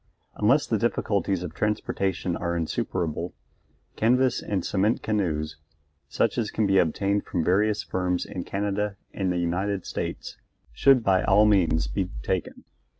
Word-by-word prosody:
Unless 135 +8 +3
the 110 -6 0
difficulties 100 -5 0
of 85 -3 -6
transportation 95 -3 -1
are 85 0 -2
insuperable, 85 +1 -2 0.6
canvas 125 +2 +2
and 95 -4 -2
cement 105 +4 +1
canoes, 80 -8 -1 0.5
such - - +1
as 110 -3 -1
can 110 - 0
be 95 -1 +4
obtained 100 +5 +1
from 85 -4 -2
various 105 +3 +2
firms 90 -1 -1
in 90 -3 -5
Canada 100 +1 -2 0.2
and 95 -2 -1
the 90 - -1
United 95 +3 -1
States, - - -5 0.3
should 130 - +4
by 95 -3 +3
all 105 - +5
means 85 -7 +3
be 95 -3 -2
taken. - - -3
95 Hz, 145 wpm, -26 LUFS, 90-105 Hz, 0.6 s, all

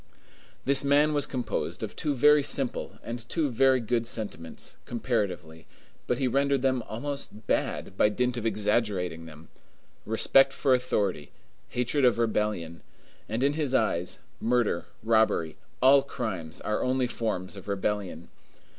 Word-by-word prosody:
This 140 +1 +4
man 145 +2 +4
was 145 -1 +1
composed 120 -5 -3
of - - -5
two 145 -2 -1
very 150 +3 +6
simple 135 -2 -2
and 120 0 -7
two 160 -4 0
very 130 +2 +4
good 115 0 -1
sentiments, 100 -9 -5
comparatively; 100 -9 -3 0.4
but 125 - +1
he 130 - +1
rendered 140 +1 +1
them 130 -2 +2
almost 120 -3 -5
bad, 95 - -1
by 105 - +4
dint 125 +3 0
of 120 - -4
exaggerating 105 -6 0
them,—respect 110 - 0
for 135 -1 +2
authority, 105 - 0 0.4
hatred 125 +4 0
of 125 -2 +4
rebellion; 105 -7 -1 0.5
and 115 +4 -1
in 140 +1 +3
his 145 -4 0
eyes, 90 -7 0 0.2
murder, 115 -6 +1 0.2
robbery, 110 -8 +2 0.3
all 135 +1 +7
crimes, 100 -12 -5
are 105 - -1
only 130 0 +1
forms 110 -6 -3
of 95 - -11
rebellion. 100 -4 -3
115 Hz, 135 wpm, -27 LUFS, 100-135 Hz, 0.5 s, all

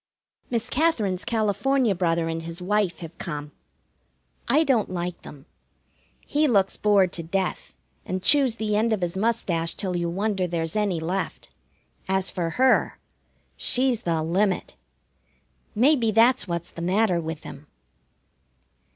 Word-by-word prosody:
Miss 235 -1 -1
Katherine's 235 - 0
California 235 +2 +1
brother 170 -2 0
and 165 0 -3
his 165 +1 -7
wife 190 -2 0
have 165 0 -9
come. 150 -3 -5 1.0
I 310 - +4
don't 255 -8 +1
like 180 -1 -4
them. 145 -1 -12 0.8
He 300 +1 +2
looks 200 -6 +2
bored 200 -3 +3
to 170 - -3
death, 185 +3 -3 0.3
and 185 0 -4
chews 270 -3 +4
the 215 -2 -1
end 220 +2 +2
of 210 - -2
his 175 0 -2
mustache 190 -6 0
till 185 -3 -3
you 170 -1 -1
wonder 195 +1 -1
there's 165 0 -2
any 205 -5 0
left. 180 +4 -4 0.6
As 190 0 +1
for 170 -3 -2
her, 255 +9 +2 0.6
she's 250 -2 +1
the 165 -4 -1
limit. 185 +4 0 1.0
Maybe 245 0 +3
that's 225 +2 +4
what's 170 -1 -4
the 170 - -8
matter 185 0 +2
with 160 -1 -6
him. - - -10
190 Hz, 140 wpm, -24 LUFS, 170-225 Hz, 1.0 s, I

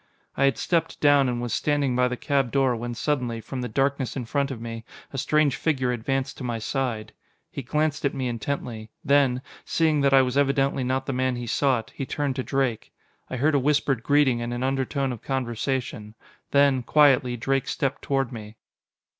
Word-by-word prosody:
I 140 - +3
had 135 - +2
stepped 165 -2 -1
down 145 -3 +4
and 120 -1 -2
was 120 - -3
standing 145 -4 +1
by 125 0 +3
the 125 0 -3
cab 135 -3 0
door 135 -3 +2
when 120 +1 -5
suddenly, 125 -3 -1
from 130 +3 -6
the 125 - -4
darkness 135 +2 0
in 130 -3 -3
front 140 +3 0
of 130 -4 -5
me, 115 0 -6 0.3
a - - -4
strange 150 0 +2
figure 130 -6 0
advanced 130 +3 -2
to - - -6
my 120 -2 -2
side. 115 -1 -3 0.4
He - - -5
glanced 150 +4 -1
at 140 - 0
me 130 -2 -2
intently; 115 -2 -4 0.2
then, 135 -3 +3 0.2
seeing 155 -3 +1
that 140 0 +3
I 135 -1 +6
was 130 +2 0
evidently 140 -1 +1
not 130 +1 -1
the 135 - -2
man 130 0 0
he 120 0 -5
sought, 125 -1 0
he 135 - -5
turned 145 -3 -2
to 130 - -1
Drake. 135 -5 -1 0.4
I 130 - -4
heard 150 +5 +2
a 140 - +4
whispered 140 -2 +1
greeting 135 -2 +3
and 120 +1 -3
an 120 - -3
undertone 135 0 -1
of 120 - -7
conversation. 120 -4 -3 0.3
Then, 140 -2 +4
quietly, 130 -2 +4
Drake 135 +3 0
stepped 135 -1 -2
toward 135 -2 -1
me. 110 -2 -9
130 Hz, 195 wpm, -25 LUFS, 120-140 Hz, 0.4 s, I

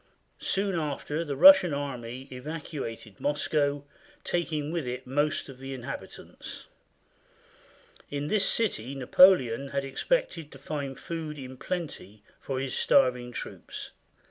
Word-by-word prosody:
Soon 195 -3 0
after 150 +1 -2
the 145 -4 -3
Russian 210 - +8
army 130 -2 -5
evacuated 130 - -6
Moscow, 145 -1 0 0.4
taking 155 -4 -1
with 165 -6 -2
it 125 +1 -4
most 145 +3 0
of 135 -2 -11
the 135 0 -6
inhabitants. 125 -2 -8 1.4
In 145 0 -3
this 200 +3 +3
city 140 - 0
Napoleon 135 -2 +5
had 140 0 -2
expected 165 - -1
to - - -10
find 140 -1 -4
food 160 -2 -5
in 130 -1 -8
plenty 130 - -5 0.2
for 135 -1 -3
his 135 -1 -3
starving 125 -1 +3
troops. - - -7
140 Hz, 120 wpm, -28 LUFS, 130-160 Hz, 1.4 s, Russian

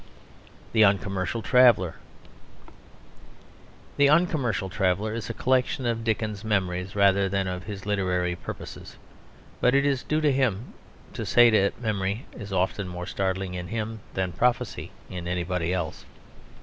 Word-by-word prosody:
THE 110 - +4
UNCOMMERCIAL 100 +1 +1
TRAVELLER 120 - +5 2.0
The 145 0 +5
Uncommercial 145 - +2
Traveller 95 +2 0
is 115 0 -5
a - - -2
collection 130 0 +1
of 115 -1 -1
Dickens's 110 -2 -2
memories 95 -3 -1
rather 100 -1 +4
than 95 0 -1
of 90 -1 -4
his 100 0 -7
literary 90 -3 0
purposes; - - -9 0.6
but 125 +2 +3
it 140 0 +3
is 135 -3 +1
due 155 - 0
to 150 -2 +3
him 130 -5 0 0.4
to - - -4
say 120 -1 +6
that 100 -1 +2
memory 105 0 -2
is 105 -3 -9
often 95 +1 0
more 90 0 -6
startling 95 -1 -2
in 90 -1 -5
him 110 +1 -4 0.2
than 95 -1 -1
prophecy 120 +7 0 0.2
in 90 -2 -6
anybody 90 -1 -1
else. 85 -4 -3
100 Hz, 140 wpm, -26 LUFS, 95-115 Hz, 2.0 s, say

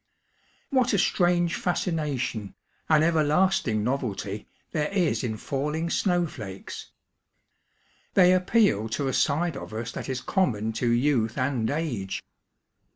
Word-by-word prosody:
What 255 -3 +2
a - - +4
strange 175 -1 +2
fascination, 150 - -2 0.3
an 155 -1 +5
everlasting 155 - +2
novelty, 110 -5 -3 0.2
there 150 -1 -1
is 180 -7 +1
in 110 -3 -2
falling 150 +7 -2
snowflakes 155 - -2
I - - -46 0.3
They 180 -1 +7
appeal 185 - +2
to 135 +5 -1
a 130 - -1
side 155 +4 +1
of - - -8
us 115 +1 -4
that - - -6
is 130 -1 -2
common 110 - 0
to 120 +2 0
youth 120 -2 +2
and 125 -4 0
age. 140 -11 -3
145 Hz, 125 wpm, -26 LUFS, 115-175 Hz, 0.3 s, They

